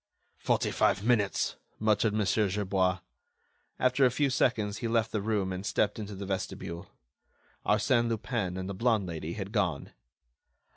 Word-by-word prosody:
"Forty - - +1
five 100 - +2
minutes," 105 -7 +1 0.2
muttered 110 0 +2
Mon. 105 -1 +1
Gerbois. 95 -2 +1 0.8
After 130 +2 +2
a 130 - +7
few 140 +2 +1
seconds, 110 -5 +1
he 120 - -2
left 115 -1 +1
the 105 - -1
room 100 -3 0
and 90 +1 -5
stepped 105 0 0
into 105 -1 -6
the 100 +1 -6
vestibule. 90 -3 -4 0.8
Arsène 115 +3 +3
Lupin 110 -4 -2
and 95 0 -4
the 100 - -4
blonde 110 0 +1
lady 85 -1 -5
had 100 0 -5
gone. 95 -10 -1
105 Hz, 150 wpm, -29 LUFS, 95-115 Hz, 0.8 s, a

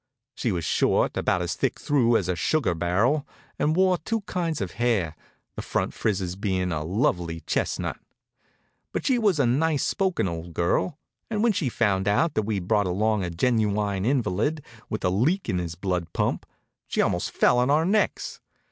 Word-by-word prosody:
She 120 - -1
was 85 -4 -2
short, - - +2
about 90 -1 +1
as 85 - -2
thick - - -1
through 120 -5 +3
as 95 - -2
a 90 - 0
sugar 130 - +1
barrel, 105 - +1 0.3
and 155 +2 +2
wore 185 -1 +3
two 225 +7 -2
kinds 170 -5 -2
of 95 -3 -3
hair, 110 -10 0 0.4
the - - -4
front - - -2
frizzes 95 -4 -1
bein' 95 -2 -1
a 75 -2 -2
lovely 85 -3 0
chestnut. - - -2 0.9
But - - -3
she 255 -3 +3
was 200 -8 +2
a 140 - +4
nice 145 +5 +2
spoken 185 - 0
old 85 -1 -6
girl, 90 - 0 0.3
and 215 -1 0
when 235 -2 +4
she 175 -9 0
found 100 -5 +1
out 145 +10 +2
that - - +1
we'd 100 -5 -2
brought 105 -2 +2
along 105 +3 +1
a 90 - -2
genuine 105 0 0
invalid 130 - 0 0.2
with 110 - -3
a - - +4
leak 150 - +1
in 90 - 0
his 85 -2 -4
blood 90 -2 -2
pump, - - -1 0.4
she - - -3
almost - - +1
fell 125 - +3
on 125 +2 +2
our 155 +3 +3
necks. 205 +3 0
110 Hz, 185 wpm, -25 LUFS, 90-150 Hz, 0.9 s, a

